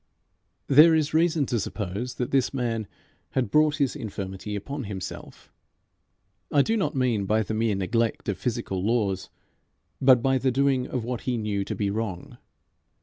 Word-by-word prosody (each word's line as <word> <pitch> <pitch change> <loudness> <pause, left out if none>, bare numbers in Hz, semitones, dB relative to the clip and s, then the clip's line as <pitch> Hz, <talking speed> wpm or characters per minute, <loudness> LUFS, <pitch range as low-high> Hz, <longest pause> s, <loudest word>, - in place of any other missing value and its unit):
There 155 +4 +7
is 155 -2 0
reason 160 -2 +3
to 120 -2 -1
suppose 105 +4 -4
that 125 - -3
this 135 0 +1
man 115 -4 -2 0.5
had 130 -2 0
brought 155 0 +4
his 140 -3 0
infirmity 100 -1 -5
upon 140 +6 -5
himself 95 -3 -8 1.0
I 140 - +5
do 225 - 0
not 155 -9 -1
mean 120 -7 +1
by 110 +2 +2
the 110 - -4
mere 110 -1 +1
neglect 115 +4 -1
of 100 -4 -2
physical 115 -6 -2
laws, 100 -4 0 0.7
but 130 -3 +6
by 135 -1 +2
the 130 - +1
doing 130 0 +1
of 125 -3 -3
what 120 0 -4
he 125 - 0
knew 105 -3 -1
to - - -4
be 100 -2 -1
wrong. 105 -5 -5
120 Hz, 165 wpm, -26 LUFS, 105-135 Hz, 1.0 s, There